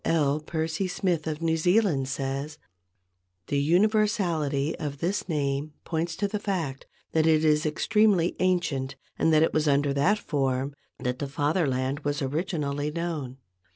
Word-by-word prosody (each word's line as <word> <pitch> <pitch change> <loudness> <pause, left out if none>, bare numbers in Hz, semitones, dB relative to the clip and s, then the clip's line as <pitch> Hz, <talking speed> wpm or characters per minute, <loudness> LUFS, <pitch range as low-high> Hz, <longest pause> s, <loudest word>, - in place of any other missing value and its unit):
L. 150 -3 +2
Percy 160 +3 -2
Smith 180 -3 -1
of 155 +1 -3
New 160 -1 +2
Zealand 175 -5 +2
says: 135 +2 -3 0.9
"The 140 - +1
universality 170 -4 +2
of 145 -2 -4
this 185 +7 -2
name 145 -1 -1
points 165 0 -2
to 205 +2 0
the 210 +1 -3
fact 170 -10 -3 0.2
that 160 0 +2
it 160 -1 +4
is 150 0 +3
extremely 200 +1 +2
ancient 160 -8 0 0.2
and 160 - +3
that 155 0 +5
it - - +1
was 155 0 +1
under 140 0 +2
that 160 +10 +3
form 135 -5 -1 0.2
the 125 -1 -1
Fatherland 140 -2 0
was 145 -1 -2
originally 145 -1 -2
known. 155 -5 -4
155 Hz, 145 wpm, -27 LUFS, 140-175 Hz, 0.9 s, that